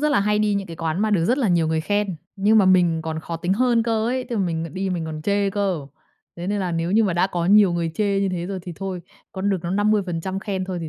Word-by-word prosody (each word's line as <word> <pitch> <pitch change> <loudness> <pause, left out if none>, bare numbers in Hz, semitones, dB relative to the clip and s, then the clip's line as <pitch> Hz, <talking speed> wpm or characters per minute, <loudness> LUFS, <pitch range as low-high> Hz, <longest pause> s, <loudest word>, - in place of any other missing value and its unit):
rất 300 - +2
là 235 - +3
hay 210 +1 +1
đi 210 -1 +2
những 200 -1 -2
cái 165 -1 -9
quán 165 +2 -2
mà 215 0 +1
được 170 -5 +2
rất 250 +8 +2
là 235 -7 +1
nhiều 170 -3 +2
người 160 0 0
khen, 205 0 -1 0.2
nhưng 210 +3 +4
mà 200 - +5
mình 175 -3 +3
còn 160 0 -4
khó 165 +1 -5
tính 175 +3 -1
hơn 240 +1 +2
cơ 225 -1 0
ấy, 255 +1 -1
tức 235 - -2
là 200 - +1
mình 165 -3 -3
đi 190 0 -2
mình 170 -3 -2
còn 155 -1 -6
chê 200 +3 +1
cơ. 190 -7 -1 0.5
Thế 175 +1 -5
nên 205 0 -1
là 180 -2 -2
nếu 165 +1 -1
như 220 +2 +4
mà 185 - +1
đã 175 +2 +2
có 175 -3 -2
nhiều 205 -2 +6
người 170 -1 -1
chê 200 -2 +1
như 195 - +1
thế 175 -1 -3
rồi 195 -1 -4
thì 180 - -7
thôi, 190 -2 -4 0.3
còn 195 +1 -1
được 195 - +1
nó 170 - -3
50% 195 -3 0
khen 195 -3 -3
thôi 185 -2 -4
thì 160 - -5
190 Hz, 300 wpm, -22 LUFS, 170-205 Hz, 0.5 s, nhiều